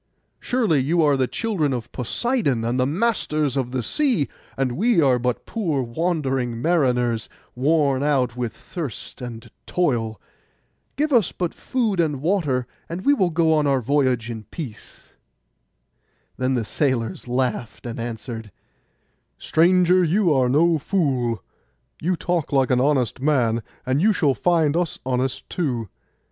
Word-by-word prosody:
'Surely 225 - +1
you 160 +6 +2
are 145 -2 +4
the 130 -1 +1
children 190 - -1
of 120 -3 -5
Poseidon, 135 - 0
and 120 +2 0
the 130 - +2
masters 155 - 0
of 130 -3 -1
the 125 -1 -2
sea; 245 - +1 0.3
and 135 -2 0
we 205 - +2
are 130 -5 +4
but 125 0 -2
poor 165 - -1
wandering 130 -3 -1
mariners, 125 -7 +1 0.2
worn 140 0 +2
out 135 -5 +1
with 120 -2 -2
thirst 135 - -7
and 115 -2 -8 0.2
toil. 115 - 0 0.8
Give 300 +1 0
us 230 -6 +4
but 175 -2 -3
food 225 -7 -1
and 150 -5 +1
water, 150 -6 0 0.2
and 175 +4 -5
we 285 - +6
will 190 -10 +2
go 160 -1 +2
on 150 -2 +2
our 135 -1 +3
voyage 130 -2 +1
in 110 -2 -6
peace.' 135 -10 -9 1.3
Then 130 +1 0
the 115 -3 -1
sailors 120 -4 -1
laughed, 125 -2 -2
and 115 -1 -5
answered, 115 -1 -6 0.9
'Stranger, 180 +2 +4
you 175 0 +3
are 130 -2 +2
no 160 +4 +3
fool; 130 - 0 0.6
you 180 +3 +1
talk 175 -2 -2
like 135 -3 +2
an 125 0 +3
honest 130 -4 +1
man, 125 -6 +2 0.2
and 130 +3 +1
you 215 +3 +4
shall 150 -7 +2
find 160 -1 +2
us 175 -2 0
honest 130 0 -1
too. 125 - -2
140 Hz, 150 wpm, -23 LUFS, 125-170 Hz, 1.3 s, we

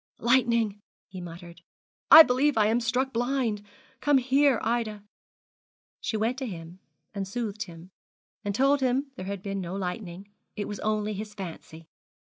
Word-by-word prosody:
'Lightning,' 235 -4 +2 0.3
he 185 -2 -8
muttered; 170 0 -10 0.5
'I 320 - +12
believe 270 0 +1
I 215 - +4
am 225 +3 +2
struck 255 +3 -1
blind. 240 -3 0 0.4
Come 290 -2 +3
here, 265 -1 +3
Ida.' 220 -3 -1 1.0
She 220 - -2
went 230 +5 -1
to 265 - -3
him 170 -2 -9 0.3
and 195 -2 -4
soothed 215 0 -4
him, 170 0 -13 0.5
and 200 -2 -2
told 275 +3 +3
him 265 +2 0
there 185 - -7
had 200 -1 -5
been 195 -1 -3
no 180 +1 -5
lightning; 185 0 -5 0.3
it 205 - -4
was 205 - -6
only 215 0 -1
his 210 +1 -7
fancy. 165 -4 -9
215 Hz, 155 wpm, -27 LUFS, 195-250 Hz, 1.0 s, I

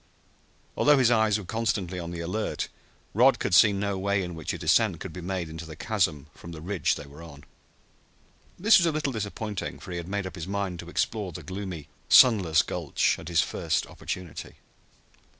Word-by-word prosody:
Although 145 0 +5
his 125 -3 +4
eyes 110 -2 +3
were 105 - -7
constantly 100 -4 -2
on 85 -1 -5
the 85 -1 -5
alert, 95 +6 -3 0.4
Rod - - +5
could - - -2
see 105 +4 +7
no 100 -1 -2
way 100 0 0
in 90 -1 -5
which 80 -2 -4
a - - -4
descent - - +2
could - - -7
be 90 - -7
made 90 -1 -3
into 80 +1 -8
the 80 -1 -9
chasm 80 -7 -1
from 85 +2 -11
the 80 - -8
ridge 90 +3 0
they - - -8
were 70 +3 -13
on. 70 -4 -12 1.1
This 210 +4 +6
was 170 - +2
a - - +2
little 150 -3 -2
disappointing, 105 -1 -4
for - - -10
he 90 - -3
had 85 -1 -6
made 100 0 -2
up 95 - -6
his 85 -2 -6
mind 100 -3 -3
to 85 - -8
explore 100 +1 -1
the - - -9
gloomy, 95 -5 -6 0.2
sunless 95 -10 +6
gulch - - 0
at - - -10
his 85 -3 +3
first - - -1
opportunity. 90 -4 -7
95 Hz, 200 wpm, -27 LUFS, 85-105 Hz, 1.1 s, see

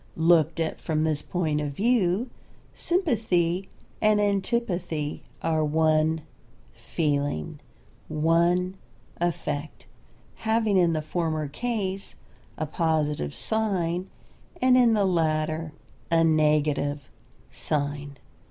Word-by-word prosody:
Looked 165 -1 +4
at 160 -1 -2
from 155 -1 0
this 155 -2 0
point 155 -3 -1
of 145 -1 -3
view, 220 - +1 0.4
sympathy 195 - 0 0.3
and 215 -1 +4
antipathy 190 -7 -1 0.2
are 160 -1 +1
one 155 +1 +2 0.5
feeling, 145 - -2 0.5
one 170 +4 +2 0.4
affect, 160 -3 -3 0.5
having 220 -2 +1
in 175 -3 +4
the 155 -1 -1
former 155 -2 -1
case 195 - -3 0.4
a 155 - -1
positive 150 - -1
sign 190 -5 -1 0.5
and 255 0 +5
in 240 -3 +5
the 205 -2 +2
latter 160 -2 0 0.4
a 165 0 +4
negative 150 -2 +2 0.4
sign. 145 -1 -3
165 Hz, 95 wpm, -26 LUFS, 155-190 Hz, 0.5 s, and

